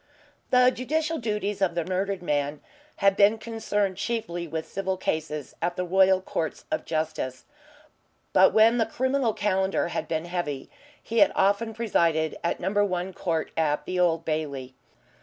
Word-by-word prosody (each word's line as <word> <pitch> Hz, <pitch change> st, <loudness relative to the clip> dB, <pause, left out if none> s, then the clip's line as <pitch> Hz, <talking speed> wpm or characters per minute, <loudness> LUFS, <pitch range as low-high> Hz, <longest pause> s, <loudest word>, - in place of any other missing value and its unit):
The 250 Hz, 0 st, +5 dB
judicial 315 Hz, +5 st, -1 dB
duties 210 Hz, -3 st, -2 dB
of 180 Hz, -3 st, +1 dB
the 170 Hz, -2 st, -1 dB
murdered 190 Hz, +1 st, -2 dB
man 145 Hz, -2 st, -1 dB, 0.3 s
had 195 Hz, -1 st, +3 dB
been 205 Hz, +2 st, +5 dB
concerned 215 Hz, -4 st, -2 dB
chiefly 200 Hz, -7 st, -3 dB
with 160 Hz, 0 st, -4 dB
civil 190 Hz, -1 st, -2 dB
cases 155 Hz, -5 st, -3 dB
at 175 Hz, +1 st, -1 dB
the 180 Hz, -, -2 dB
Royal 190 Hz, +1 st, +4 dB
Courts 160 Hz, -4 st, -4 dB
of 310 Hz, -, -1 dB
Justice, 155 Hz, -5 st, -3 dB, 0.9 s
but -, -, +6 dB
when 225 Hz, +2 st, +5 dB
the 225 Hz, -, +2 dB
criminal 260 Hz, 0 st, 0 dB
calendar 190 Hz, -3 st, 0 dB
had 160 Hz, -, -3 dB
been 160 Hz, 0 st, -2 dB
heavy 175 Hz, -6 st, -4 dB, 0.3 s
he 230 Hz, 0 st, -1 dB
had 200 Hz, -, +6 dB
often 205 Hz, +3 st, +1 dB
presided 165 Hz, -8 st, +1 dB
at 170 Hz, -, -1 dB
Number 200 Hz, +3 st, +1 dB
One 185 Hz, -1 st, -2 dB
Court 165 Hz, -3 st, -2 dB
at 150 Hz, -2 st, 0 dB
the 180 Hz, 0 st, -2 dB
Old 165 Hz, -2 st, +2 dB
Bailey. 140 Hz, -5 st, -3 dB
185 Hz, 160 wpm, -26 LUFS, 160-215 Hz, 0.9 s, but